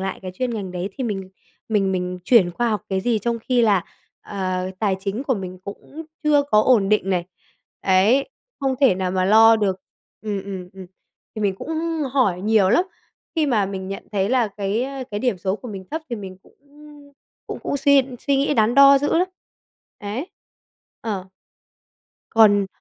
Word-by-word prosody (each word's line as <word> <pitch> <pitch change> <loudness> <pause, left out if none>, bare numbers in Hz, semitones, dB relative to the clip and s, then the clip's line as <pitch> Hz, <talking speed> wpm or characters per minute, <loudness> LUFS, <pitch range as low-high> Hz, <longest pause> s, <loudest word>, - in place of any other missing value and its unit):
lại 195 0 -3
cái 185 - -5
chuyên 250 +5 -2
ngành 195 -4 -5
đấy 180 +1 -3
thì 260 - -2
mình 195 -4 -4 0.4
mình 195 -3 +1
mình 180 0 -3
chuyển 215 -8 +5
qua 235 +7 -1
học 210 -4 -1
cái 190 -1 -1
gì 230 +2 +1
trong 235 +3 -2
khi 245 +1 +1
là, 200 -5 +3 0.4
ờ, 185 -2 -3
tài 200 -3 +1
chính 200 +5 -3
của 275 -2 0
mình 185 -3 -6
cũng 280 +10 -9 0.2
chưa 295 -2 +4
có 210 - +6
ổn 220 -6 +3
định 205 -2 +1
này, 175 -2 0 0.6
ấy, 200 +8 +3 0.3
không 270 -1 0
thể 265 -8 +5
nào 185 0 -2
mà 185 0 0
lo 225 +3 +7
được 195 -3 -1 0.4
ừm, 205 -3 -3
ừm, 190 -2 -7
ừm. 190 -1 -10 0.5
Thì 215 - -5
mình 195 -2 +1
cũng 240 - -9 0.4
hỏi 205 -10 +2
nhiều 210 -1 +3
lắm, 350 - +4 0.5
khi 310 - +2
mà 220 -7 +2
mình 190 -1 -6
nhận 195 - -7
thấy 195 -1 0
là 245 -4 +2
cái 205 +3 -1
ơ, 270 -1 -6
cái 205 - -3
điểm 245 -6 0
số 190 +3 -1
của 245 - -10
mình 195 -3 -7
thấp 320 +1 -4
thì 235 - -2
mình 190 -3 -8
cũng - - -24 0.9
cũng - - -6
cũng - - -2
suy 280 -1 +4 0.2
suy 280 -1 0
nghĩ 285 +2 +1
đắn 225 +2 +2
đo 275 0 +8
dữ 290 - 0
lắm. 365 - +1 0.7
Ấy, 210 - -5 0.7
ờ. 200 -5 -4 1.1
Còn 205 -3 +5
205 Hz, 190 wpm, -22 LUFS, 190-245 Hz, 1.1 s, đo